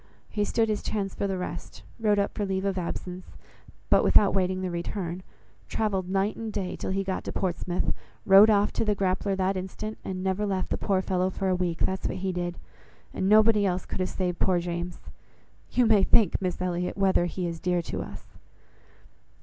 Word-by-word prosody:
He 210 - 0
stood 225 +2 +1
his 215 -1 -1
chance 195 -3 -2
for 200 - -2
the 190 -1 -2
rest; 175 -1 -6 0.2
wrote 210 -2 +3
up 200 - 0
for 210 - -2
leave 190 -1 -1
of 195 -1 0
absence, 180 +1 -6 0.5
but - - +6
without 205 - +5
waiting 185 -1 +1
the 185 - -2
return, 175 +1 -4 0.5
travelled 195 -4 -1
night 195 +2 +1
and 225 -1 -5
day 195 -3 -3
till - - -5
he 195 +1 0
got 190 -1 -3
to - - -3
Portsmouth, 180 -1 -1 0.3
rowed 200 +2 +8
off 205 -1 +3
to - - 0
the 210 -2 +1
Grappler 195 0 0
that 190 +1 +1
instant, 190 +4 -5
and 185 -1 -4
never 190 +2 0
left 195 -2 -1
the - - +2
poor 190 -2 +1
fellow 185 0 +1
for 190 0 -2
a 185 - +2
week. 175 -2 -2
That's 190 0 -2
what - - -4
he 190 0 -2
did, 175 -1 -3 0.6
and 190 - 0
nobody 215 0 +6
else 185 -2 0
could - - -6
have 185 - 0
saved 180 -2 -2
poor 185 -2 +3
James. 175 0 -4 0.7
You 250 - +3
may 220 -3 +5
think, 200 -1 +4
Miss 185 -2 -2
Elliot, 180 0 -2
whether 190 -3 +3
he 180 +1 -3
is 170 -1 -4
dear 180 -1 0
to - - -4
us!" - - -9
190 Hz, 205 wpm, -27 LUFS, 180-200 Hz, 0.7 s, rowed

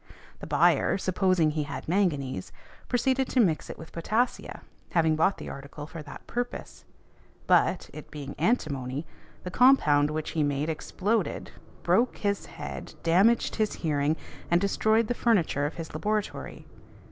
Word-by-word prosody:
The - - -8
buyer, - - +3
supposing 185 -4 +2
he 155 0 -1
had 145 - -6
manganese, 145 - 0 0.4
proceeded 260 +1 +1
to 260 - +1
mix 175 -9 +2
it - - -7
with 160 - -11
potassia, 220 +9 -1 0.3
having 160 -2 +3
bought 175 +5 +2
the - - -8
article 140 +2 -8
for 165 +1 -8
that 150 - -11
purpose. 245 0 -5 0.6
But, - - +3
it - - -10
being 145 -3 -7
antimony, 140 - 0 0.4
the 180 - -5
compound 155 - +5
which 155 0 -3
he 160 - 0
made 145 +1 0
exploded, 200 +7 -2 0.3
broke 245 +2 +2
his 200 -1 -1
head, - - -8
damaged 195 +8 +3
his 215 -2 +1
hearing, 150 -1 0 0.3
and 170 - +4
destroyed 220 +3 +2
the 245 - -1
furniture 180 -12 +1
of 150 - -7
his 165 -2 -7
laboratory. 210 +6 -3
170 Hz, 145 wpm, -27 LUFS, 150-215 Hz, 0.6 s, compound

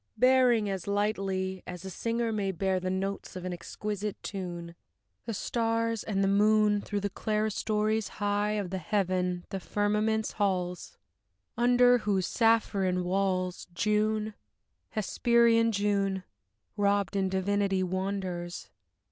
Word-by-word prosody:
bearing, 250 -3 +4
as 195 -2 -4
lightly 195 -2 -1
As 180 0 -7
a 190 - -5
singer 230 +4 -1
may 205 -3 -1
bear 190 +1 0
the 185 0 -3
notes 195 +1 -3
of 185 -1 -6
an 180 - -3
exquisite 205 +4 -4
tune, 175 -3 -5 0.5
The 230 - -2
stars 230 0 0
and 195 -2 0
the - - +3
moon 210 +1 +4
Through 205 0 -3
the 205 - -1
clerestories 215 0 0
high 205 0 0
of 200 -4 -2
the 190 - -2
heaven, 180 -1 -1
the 195 - -3
firmament's 210 +3 0
halls: 180 -3 -2 0.6
Under 245 +1 +5
whose 200 -4 0
sapphirine 200 -6 +2
walls, 185 0 -1
June, 215 +2 +1 0.6
hesperian 230 +1 +3
June, 200 -2 0 0.5
Robed 200 0 +1
in 190 -1 +1
divinity 195 0 +1
wanders. 185 -2 -3
200 Hz, 125 wpm, -29 LUFS, 190-215 Hz, 0.6 s, Under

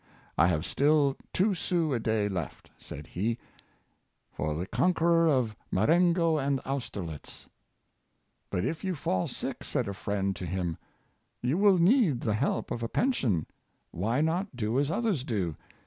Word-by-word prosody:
I 85 - +5
have 80 -3 0
still 145 -1 +3 0.2
two 200 +2 +2
sous 165 -5 0
a - - 0
day 110 -2 +1
left," 90 -6 -5
said 75 - -9
he, 110 +8 -2 0.5
" - - -46
for 75 -1 -1
the 85 +4 -2
conqueror 170 - +3
of 125 -8 +2 0.2
Marengo 165 - +3
and 135 -1 +1
Austerlitz." 100 - -5 0.3
' - - -48
' - - -47
But 90 - -1
if 160 - -3
you 190 -2 -1
fall 95 -10 -1
sick," - - -5
said - - -1
a 100 - -3
friend 100 0 -2
to 90 - -5
him, 85 -2 -2 0.3
'' - - -46
you 125 +5 +1
will 200 -2 +6
need 175 - +4
the 110 - 0
help 120 +7 -1
of 120 - -3
a 115 - -2
pension. 125 - +1 0.5
Why 115 - 0
not 170 +2 0
do 115 +1 0
as 140 0 +1
others 195 - 0
do. 95 - -2
130 Hz, 170 wpm, -29 LUFS, -, 0.5 s, will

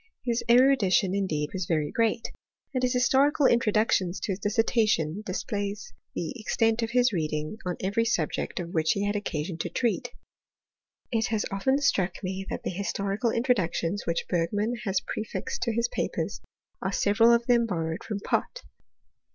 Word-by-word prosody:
His 235 -1 0
erudition, 235 -7 +4
in 200 -1 0
deed, 150 -3 -2
was 185 -2 -3
very 155 -3 0
great; 230 0 0 0.4
and 255 - 0
his 250 0 +1
historical 270 +3 +3
introductions 215 -6 +2
to 205 - -2
his 190 - -3
dissertation 210 -5 +1
displays 205 - -3 0.2
the - - -3
extent 225 +1 +1
of 225 - -1
his 245 -1 +3
reading 155 +3 -2
on 180 - -2
every 205 +4 +1
subject 175 -8 -1
of 170 -1 -5
which 160 -1 +2
he 200 0 -1
had 205 +1 0
occasion 170 -4 -3
to 175 - -2
treat. 230 +6 -1 1.0
It 225 -2 +1
has 220 -2 -1
often 265 +8 +1
struck 195 -11 +1
me 190 +1 -4
that - - -4
the - - -2
historical 200 +4 -1
introductions 205 -6 0
which 170 0 0
Bergmann 205 +7 0
has 195 -2 +1
prefixed 215 - -4
to 235 - +1
his 235 +1 +1
papers, - - -3 0.4
are 190 - -1
several 215 +4 +4
of 235 0 +3
them 235 -2 +3
borrowed 165 -4 -3
from 210 -2 -4
Pott. - - -1
205 Hz, 165 wpm, -27 LUFS, 180-235 Hz, 1.0 s, erudition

